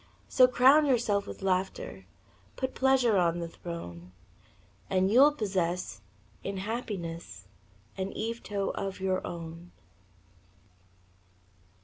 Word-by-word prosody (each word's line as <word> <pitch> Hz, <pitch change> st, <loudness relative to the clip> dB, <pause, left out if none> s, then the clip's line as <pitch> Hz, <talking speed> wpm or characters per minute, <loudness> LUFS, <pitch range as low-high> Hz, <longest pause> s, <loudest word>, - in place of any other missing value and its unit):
So, 255 Hz, -1 st, +6 dB
crown 270 Hz, +4 st, +5 dB
yourself 225 Hz, -6 st, +1 dB
with -, -, -8 dB
laughter, 190 Hz, -, -2 dB, 0.5 s
Put 260 Hz, 0 st, -3 dB
pleasure 260 Hz, -5 st, +3 dB
on 170 Hz, -1 st, +2 dB
the 170 Hz, -1 st, -3 dB
throne, 90 Hz, -, -8 dB, 0.8 s
And 190 Hz, +1 st, +2 dB
you'll 275 Hz, +6 st, +7 dB
possess 180 Hz, -, -2 dB, 0.4 s
in 195 Hz, 0 st, -4 dB
happiness 175 Hz, -, -5 dB, 0.5 s
An 190 Hz, +1 st, -2 dB
Yvetot 215 Hz, -3 st, -3 dB
of 195 Hz, -1 st, -4 dB
your 190 Hz, 0 st, 0 dB
own. 170 Hz, 0 st, -8 dB
195 Hz, 100 wpm, -29 LUFS, 170-235 Hz, 0.8 s, you'll